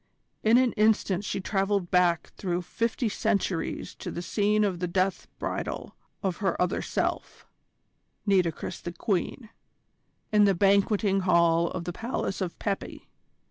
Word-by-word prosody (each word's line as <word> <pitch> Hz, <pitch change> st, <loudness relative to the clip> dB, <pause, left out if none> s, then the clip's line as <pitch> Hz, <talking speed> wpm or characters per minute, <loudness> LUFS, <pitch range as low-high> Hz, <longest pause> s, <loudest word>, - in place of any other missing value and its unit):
In 220 Hz, +2 st, +5 dB
an 255 Hz, -2 st, +4 dB
instant 210 Hz, -3 st, +2 dB
she 200 Hz, -, -2 dB
travelled 195 Hz, -1 st, 0 dB
back 175 Hz, -2 st, +2 dB
through 180 Hz, -2 st, -2 dB
fifty 230 Hz, +6 st, -1 dB
centuries 200 Hz, -5 st, -1 dB
to -, -, -5 dB
the 175 Hz, -, -5 dB
scene 210 Hz, +3 st, +2 dB
of 190 Hz, -4 st, 0 dB
the 180 Hz, -, -1 dB
death 185 Hz, +2 st, 0 dB
bridal -, -, -4 dB, 0.3 s
of 185 Hz, -3 st, -1 dB
her 190 Hz, -4 st, -1 dB
other 180 Hz, 0 st, +1 dB
self, -, -, -3 dB, 0.8 s
Nitocris 185 Hz, -5 st, 0 dB
the 175 Hz, -, -5 dB
Queen, 215 Hz, +4 st, -2 dB, 0.8 s
in 210 Hz, -1 st, +5 dB
the 195 Hz, -1 st, +3 dB
banqueting 200 Hz, +1 st, +3 dB
hall 170 Hz, -2 st, +3 dB
of 170 Hz, -, -4 dB
the 175 Hz, +1 st, -4 dB
Palace 225 Hz, -2 st, -3 dB
of 180 Hz, -2 st, -3 dB
Pepi. 200 Hz, -2 st, -4 dB
195 Hz, 140 wpm, -27 LUFS, 180-210 Hz, 0.8 s, In